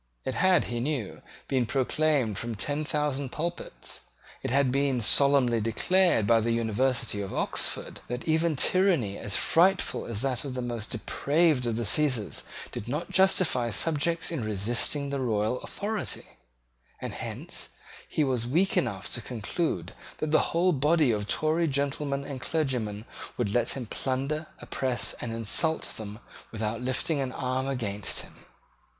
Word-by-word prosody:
It 130 - -1
had, 185 +2 +4
he 120 0 -3
knew, 130 -5 -3 0.3
been 130 -3 +1
proclaimed 135 -4 +1
from 120 -1 -4
ten 145 +9 -1
thousand 145 -3 -1
pulpits, 170 +2 -4 0.4
it - - -3
had 135 0 +3
been 140 -1 +1
solemnly 125 0 +5
declared 170 - +3
by 115 +1 +5
the 115 +1 -1
University 115 -1 0
of 95 - -5
Oxford, - - -1
that 125 +4 -5
even 160 0 +2
tyranny 165 - +2
as 100 - -1
frightful 185 +3 +2
as 115 -1 -3
that 130 -3 0
of 135 -3 -5
the 125 - -2
most 120 -2 -4
depraved 140 +3 +1
of 115 - 0
the 120 0 -1
Caesars 125 -2 +2 0.3
did 105 - -6
not 150 +7 -3
justify 185 -10 +3
subjects 165 +6 +1
in 155 -8 -2
resisting 115 +7 -1
the 140 - -1
royal 110 -1 0
authority; 210 +1 -3 0.7
and - - -5
hence - - -4 0.4
he 155 - +1
was 125 -4 0
weak 175 +9 +2
enough 100 - -1
to 120 - -1
conclude 110 - -3 0.2
that 155 - -2
the 155 - +4
whole 175 +2 +3
body 150 -1 +3
of 105 -2 -2
Tory 160 +6 +1
gentlemen 140 0 -1
and 140 -2 -6
clergymen 120 -10 -2 0.3
would 105 -5 -1
let 120 +2 +1
him 125 - -4
plunder, 135 +7 -2
oppress, 130 -3 0
and 120 - -4
insult 115 +8 +2
them 105 -1 -7 0.3
without 110 +1 -3
lifting 130 +4 0
an 130 -2 -2
arm 130 0 -1
against 105 -7 -2
him. - - -14
130 Hz, 155 wpm, -28 LUFS, 115-155 Hz, 0.7 s, solemnly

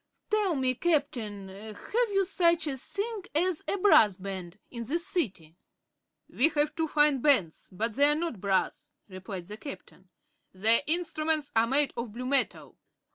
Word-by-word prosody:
"Tell 415 -5 +1
me, 260 -2 +1
Captain, 250 - -2
have 220 - -3
you 390 -1 +2
such 340 -3 +2
a 285 -3 -2
thing 400 - -5
as 350 +1 0
a - - -1
Brass 220 - +5
Band 190 -1 -7
in 235 -2 -6
this 335 +8 -2
City?" 190 - -3 0.7
"We 295 +6 +2
have 295 -1 0
two 325 -1 -1
fine 295 -2 +3
bands, 220 - +1
but 215 +5 -2
they 285 +4 +4
are 295 - +3
not 310 - -4
brass," 195 -2 -1
replied 185 -1 -8
the 210 +3 -9
Captain. 220 -8 -11 0.4
"Their 220 +5 +5
instruments 310 -2 0
are 225 +1 +3
made 280 +3 +1
of 235 -3 -5
blue 250 +2 -6
metal." 275 +1 0
275 Hz, 160 wpm, -28 LUFS, 205-325 Hz, 0.7 s, Brass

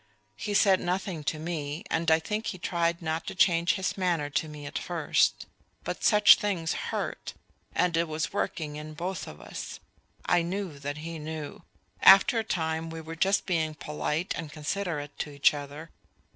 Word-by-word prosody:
He 205 - -3
said 195 -2 +5
nothing 180 -2 -2
to 155 - 0
me, 155 -1 -4
and 165 0 +1
I 160 - +6
think 210 +7 -3
he - - -3
tried 170 -1 -1
not 160 +1 -2
to - - -4
change 170 -2 +4
in - - -3
his 190 0 -1
manner 170 -6 0
to 150 +2 0
me 150 -1 -9
at - - -4
first; - - +1 0.4
but - - -4
such 210 -1 +8
things 180 -6 -1 0.2
hurt - - -4 0.4
and 175 -2 +2
it 165 +1 +2
was 155 +2 -3
working 155 -6 -2
in 155 0 -8
both 180 +3 -4
of 75 - -10
us. - - -7 0.5
I 175 -1 +3
knew 175 -3 -4
that 145 +1 -4
he 165 -1 -5
knew. 155 -1 -6 0.4
After 195 +4 +8
a - - 0
time 160 -5 -2
we 165 0 -6
were 160 0 -7
just 195 +5 +2
being 160 -4 0
polite 150 +3 -2
and 160 -2 -6
considerate 150 -1 -3
to - - -2
each 140 0 +4
other. 145 +2 -7
165 Hz, 185 wpm, -28 LUFS, 150-180 Hz, 0.5 s, such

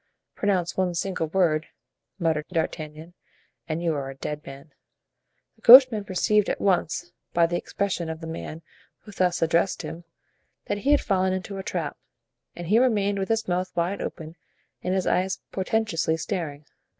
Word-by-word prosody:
"Pronounce 185 -4 0
one 185 -2 0
single 175 -2 -2
word," 160 -2 +1 0.5
muttered 160 -4 0
D'Artagnan, 160 -1 -4 0.6
"and 160 +2 -2
you 165 -2 +1
are 140 -2 -3
a 135 - -8
dead 150 +2 -5
man." 140 +3 -11 0.9
The - - -27
coachman 245 -4 +9
perceived 205 +2 +2
at - - -1
once, 175 -2 0 0.2
by 170 -1 +5
the 170 +1 -2
expression 185 -5 -2
of 160 0 -5
the 165 - -8
man 160 0 -7 0.4
who 210 - -12
thus 180 -3 +1
addressed 170 +3 +1
him, 170 +2 -7 0.6
that 205 - -2
he 270 - -1
had 290 0 +5
fallen 190 -2 +1
into 190 +1 -4
a - - -5
trap, - - -3 0.6
and 175 - -6
he 210 +7 +4
remained 205 -5 +2
with 190 - -2
his 225 -1 0
mouth 180 +1 -1
wide 175 +4 -1
open 160 0 -6 0.4
and 185 +1 -1
his 190 - 0
eyes 185 +1 +1
portentously 190 -5 0
staring. 160 -4 -4
180 Hz, 165 wpm, -25 LUFS, 160-195 Hz, 0.9 s, coachman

